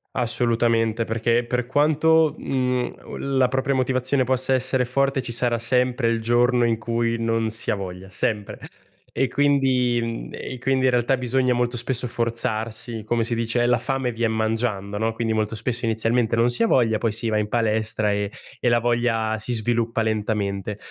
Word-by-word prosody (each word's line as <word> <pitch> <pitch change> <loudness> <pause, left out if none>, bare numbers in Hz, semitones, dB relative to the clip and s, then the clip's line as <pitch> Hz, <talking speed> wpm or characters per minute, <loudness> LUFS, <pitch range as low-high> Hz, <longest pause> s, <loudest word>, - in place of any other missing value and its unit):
Assolutamente. 115 -2 +1
Perché 115 +2 0
per 125 0 -1
quanto, 155 +2 +3
mhmm, 125 -2 -1 0.4
la 130 - +4
propria 130 +2 0
motivazione 130 +1 +1
possa 130 +1 +1
essere 130 0 +1
forte 135 +2 0
ci 120 - -6
sarà 120 0 +1
sempre 125 +1 +1
il 115 -1 0
giorno 120 +1 +3
in 115 -1 +1
cui 115 +1 -1
non 115 -1 0
si 110 +1 -3
ha - - +1
voglia, 95 -1 -7
sempre. 105 0 -3 0.5
E 135 - +1
quindi 125 -4 +1
e 130 - -7
quindi 130 +1 +1
in 130 - +4
realtà 125 +2 +2
bisogna 130 +1 +1
molto 120 0 0
spesso 125 +1 -1
forzarsi, 115 -1 -2
come 115 +1 0
si 115 - 0
dice 115 +1 0
"la 120 0 +3
fame 130 +1 -2
vien 115 0 0
mangiando", 110 -2 -1
no? 110 +2 0
Quindi 115 0 -2
molto 110 0 -1
spesso 115 +2 -3
inizialmente 115 +1 +1
non 115 - +4
si 120 - +1
ha - - +3
voglia, 115 - +3
poi 115 0 0
si 110 +2 -2
va 110 -1 +1
in 105 0 -1
palestra 110 -2 0
e 100 0 -2 0.3
e 120 - +2
la 120 0 +3
voglia 115 -2 0
si 110 +3 -5
sviluppa 115 0 0
lentamente. 105 -2 -2
120 Hz, 175 wpm, -23 LUFS, 110-125 Hz, 0.5 s, la